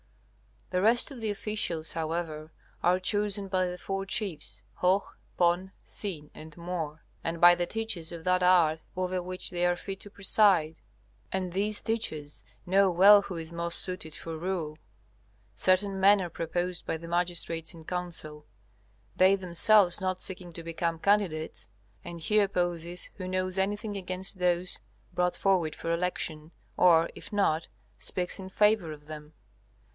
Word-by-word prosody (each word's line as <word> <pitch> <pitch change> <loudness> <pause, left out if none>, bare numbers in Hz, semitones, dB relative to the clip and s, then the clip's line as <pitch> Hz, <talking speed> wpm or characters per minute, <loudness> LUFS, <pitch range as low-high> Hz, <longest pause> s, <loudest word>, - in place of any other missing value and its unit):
The 180 0 +1
rest 235 +7 +4
of 265 - -9
the 220 -1 -2
officials, 200 -6 -1
however, 160 -1 -4 0.3
are 180 +1 +3
chosen 205 +1 -1
by 185 -1 +1
the 180 0 -5
four 195 +1 -4
chiefs, 165 - -3
Hoh, 185 +2 +2 0.3
Pon, 175 +2 +1
Sin 155 -8 -2
and 155 0 -11
Mor, 165 -3 -5 0.2
and 165 0 -3
by 175 0 +9
the 175 0 -1
teachers 220 -7 -2
of 170 -1 -8
that 185 +1 +2
art 175 -3 +4 0.2
over 185 0 -2
which 185 +1 -3
they 175 -1 -2
are 175 0 +2
fit 195 +2 -7
to 205 - -10
preside. 190 -5 +3 0.5
And 185 -2 -2
these 205 +3 +1
teachers 155 -10 -2 0.2
know 195 +2 +4
well 200 +3 +7
who 190 - -6
is 165 0 -6
most 170 0 -2
suited 180 -4 -2
for 165 -1 -6
rule. 165 -3 -3 0.8
Certain 190 +1 +1
men 200 +1 +6
are 175 - -4
proposed 175 +2 -2
by - - -1
the 165 +1 -10
magistrates 170 -1 0
in 165 - -12
council, 160 -4 -5 0.7
they 190 +1 +6
themselves 190 +1 +5
not 185 -1 -2
seeking 180 -2 0
to 170 - -6
become 165 0 -2
candidates, 180 - 0 0.4
and 170 -1 -8
he 215 +6 +2
opposes 175 -3 -1
who 185 -2 -5
knows 185 0 -1
anything 205 +2 -2
against 185 +1 -1
those 180 0 0 0.3
brought 180 0 0
forward 180 -5 +1
for 165 - -4
election, 165 -3 -2 0.3
or, 170 -2 +5
if - - -9
not, 165 -6 +1 0.3
speaks 180 0 0
in 190 0 -7
favor 210 -4 +2
of 150 -1 -11
them. 150 0 -9
180 Hz, 155 wpm, -28 LUFS, 165-195 Hz, 0.8 s, by